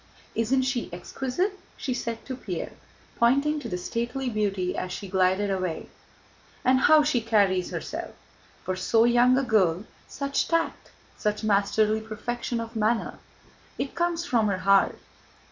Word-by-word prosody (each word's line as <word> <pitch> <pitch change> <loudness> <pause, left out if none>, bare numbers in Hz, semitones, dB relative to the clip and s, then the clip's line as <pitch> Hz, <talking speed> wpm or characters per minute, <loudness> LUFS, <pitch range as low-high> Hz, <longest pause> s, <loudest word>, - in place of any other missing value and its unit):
"Isn't 255 +4 +1
she 260 -5 -2
exquisite?" 265 - -3 0.2
she 255 - -2
said 230 -2 -4
to 260 - -4
Pierre, 195 -9 -5 0.5
pointing 280 +6 +3
to - - -6
the 180 - -2
stately 235 +7 -3
beauty 195 -4 -1
as 185 - -3
she 200 +2 -6
glided 190 +2 +2
away. 185 -4 -3 0.8
"And 260 +1 +5
how 305 +3 +6
she 290 -5 +1
carries 200 -5 +2
herself! - - -5 0.5
For 185 - -2
so 225 +4 +3
young 245 +1 +5
a 275 - +2
girl, 200 -6 +2 0.2
such 280 0 -1
tact, 330 0 -1 0.3
such 210 +1 -1
masterly 210 +1 +2
perfection 235 +2 -4
of 230 0 -6
manner! 220 +1 0 0.6
It 275 - -3
comes 345 0 -1
from 230 -8 +2
her 200 -2 0
heart. 195 0 +4
225 Hz, 145 wpm, -26 LUFS, 200-260 Hz, 0.8 s, how